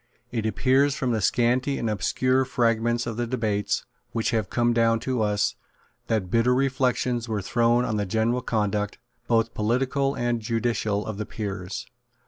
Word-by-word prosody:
It 115 -3 -1
appears, 130 +6 +2
from 130 -4 -1
the 110 -2 0
scanty 125 +7 +2
and 115 - -2
obscure 130 +5 +1
fragments 120 -1 +1
of 115 -2 -4
the 120 0 -1
debates 110 -4 -1 0.3
which 115 +1 0
have 110 -5 0
come 120 0 +2
down 115 -1 +3
to 130 -3 -1
us, 105 -1 +1 0.5
that 105 -5 -1
bitter 120 +2 +3
reflections 125 -2 0
were 110 -2 -1
thrown 120 +3 +2
on 110 - -1
the 105 -1 -1
general 115 +5 +1
conduct, 105 -3 -1 0.3
both 115 -1 +2
political 135 +5 0
and 120 -1 -1
judicial, 110 -2 -1
of 110 -2 -5
the 105 - -2
Peers. 100 -3 -5
115 Hz, 160 wpm, -25 LUFS, 110-125 Hz, 0.5 s, down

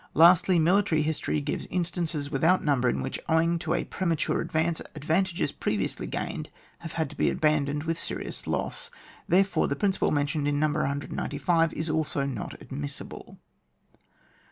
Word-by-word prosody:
Lastly, 175 +3 +6
military 170 -1 +3
history 150 - -1
gives - - -3
in 180 0 0
stances 165 -4 -2
without 160 +6 +3
number 130 -4 +2
in - - -1
which, - - -3
owing 165 +1 +3
to 165 0 -1
a - - 0
premature 170 -5 0
advance, 160 +1 0
advantages 170 +5 0
previously - - -2
gained - - -4 0.3
have 165 -1 -8
had 160 -1 0
to - - -11
be - - +2
aban 150 -2 +2
doned 145 +1 -2
with'Serious 165 +1 -4
loss. - - -2 0.4
Therefore, 195 +3 +3
the 140 - -1
principle 195 +5 +1
mentioned 145 0 0
in 145 0 +1
No. 155 0 +3
195 145 +3 0
is 160 - -3
also 155 -3 0
not 130 -7 -5
admissible. 70 0 -7
160 Hz, 155 wpm, -27 LUFS, 145-170 Hz, 0.4 s, Lastly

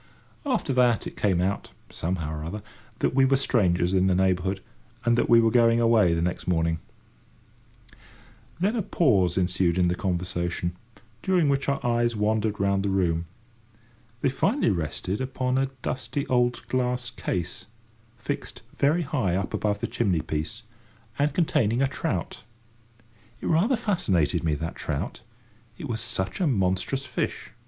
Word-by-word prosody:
After 225 - 0
that 125 -2 +3
it - - -6
came 95 -4 +1
out, 95 +2 -1 0.2
somehow 80 -3 -3
or 75 0 -5
other, 100 +6 -5 0.3
that - - 0
we 135 0 +4
were 135 +1 +4
strangers 90 -9 +2
in 95 0 +3
the 95 - +3
neighbourhood, 95 +1 +1 0.5
and 120 0 +4
that 120 - +1
we 115 - +7
were 115 -1 +3
going 115 -1 +4
away 115 -7 +4
the 85 - 0
next 90 +1 -2
morning. 80 -2 +1 1.1
[Picture: - - -27
The - - -21
trout] - - -24 0.6
Then 205 +5 +2
a - - +1
pause 100 - +2
ensued 90 -1 +1
in 90 -1 +3
the - - +1
conversation, 90 -1 -2 0.5
during 180 -3 +2
which 140 0 +1
our 140 - 0
eyes 120 -1 +1
wandered 105 0 0
round 100 0 +2
the 100 - -1
room. 85 -3 +1 0.9
They - - +3
finally 205 - +1
rested 90 - -2
upon 130 0 -1
a 135 0 0
dusty 140 +2 -2
old 125 -1 +1
glass 125 -1 -1
case, 90 -1 -4 0.5
fixed 115 - -5
very 155 +5 +2
high 130 - 0
up 95 +1 -2
above 105 -1 -1
the - - 0
chimney 95 -8 0
piece, 80 +9 -4 0.6
and 145 +1 +3
containing 130 - +2
a - - +3
trout. - - -3 1.0
It - - -8
rather 200 +11 +3
fascinated 90 - +1
me, 80 -2 +1
that 80 +3 -4
trout; 80 - -4 0.6
it 150 - -6
was 115 -3 -2
such 95 - -3
a 175 - +3
monstrous 100 +4 0
fish. - - -3
105 Hz, 165 wpm, -26 LUFS, 90-130 Hz, 1.1 s, we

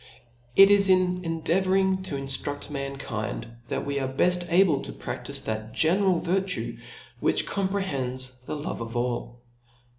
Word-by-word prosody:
It 195 +1 +9
is 200 -1 +5
in 180 -1 +3
endeavouring 190 +3 +1
to 150 - -3
inftrufl: 140 +2 -2
mankind^ 140 -6 -4 0.2
that - - -2
we 140 0 -1
are 135 - -1
beft 175 +5 +1
able 175 -5 +5
to - - -6
praftife - - -5
that 110 0 -4
general 180 +2 +3
virtue, 190 +1 -1 0.4
which - - +2
comprehends 135 -11 -2
the - - -3
love 145 -5 -4
of 115 +1 -5
all. 120 0 -3
160 Hz, 140 wpm, -26 LUFS, 130-190 Hz, 0.4 s, It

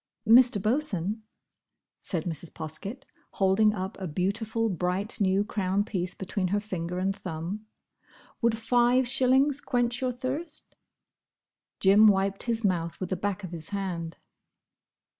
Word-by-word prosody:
"Mr. 240 -1 +6
Bosun," 215 - 0 0.8
said 170 -4 -1
Mrs. 165 -1 -3
Poskett, 195 - -5 0.3
holding 210 +2 +3
up 190 +2 -5
a 190 - -4
beautiful, 215 +7 -1
bright 185 +3 -2
new 195 +1 +3
crown 200 -2 0
piece 185 -4 -2
between 190 0 -2
her 205 +3 +1
finger 180 -4 -4
and 195 +1 0
thumb, 185 +5 -6 0.7
"would 230 -1 +2
five 245 +2 +3
shillings 265 +3 +3
quench 245 -2 0
your 255 -1 0
thirst?" 280 +6 -5 1.0
Jim 200 +3 +6
wiped 195 -1 +2
his 230 -1 0
mouth 170 -3 -1
with 185 -1 -5
the - - +1
back 200 +2 -3
of 185 - -6
his 165 -2 -7
hand. 180 -5 -4
200 Hz, 135 wpm, -27 LUFS, 185-230 Hz, 1.0 s, Mr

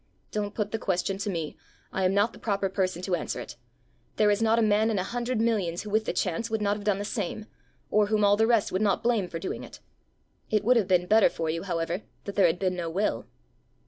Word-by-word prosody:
"Don't 205 -1 -3
put 210 -2 -2
the 225 - -2
question 190 0 -1
to 205 - -2
me; 165 -5 -3 0.4
I 190 - 0
am 185 - +2
not 205 +3 +2
the - - -13
proper 200 -3 -1
person 185 -2 -1
to 185 - -2
answer 175 - -2
it. - - -8 0.6
There 210 -1 +4
is 205 +2 +1
not 225 0 +3
a - - +3
man 215 +1 +3
in 215 - 0
a 185 - 0
hundred 240 +3 -2
millions 205 -7 0
who 210 - -7
with 220 +1 +2
the - - 0
chance 205 +5 -1
would 220 0 -1
not 205 -1 +1
have 205 - -7
done 205 -1 +1
the 205 - -4
same, 210 0 -3 0.5
or 210 -1 +4
whom 210 -1 +2
all 200 0 +5
the 220 +2 +3
rest 230 -3 +2
would 185 - 0
not 205 -2 +1
blame 230 -6 +2
for 165 - -5
doing 165 - -5
it. - - -11 0.7
It 215 -1 +1
would 250 +4 +4
have 210 -5 +1
been 180 -1 +3
better 215 +1 +5
for 165 -2 -2
you, 165 +1 -3
however, 170 0 -2 0.2
that 200 - -5
there 195 -3 +5
had 165 - 0
been 185 0 0
no 170 -2 -3
will." 195 +6 -1
205 Hz, 255 wpm, -27 LUFS, 185-215 Hz, 0.7 s, all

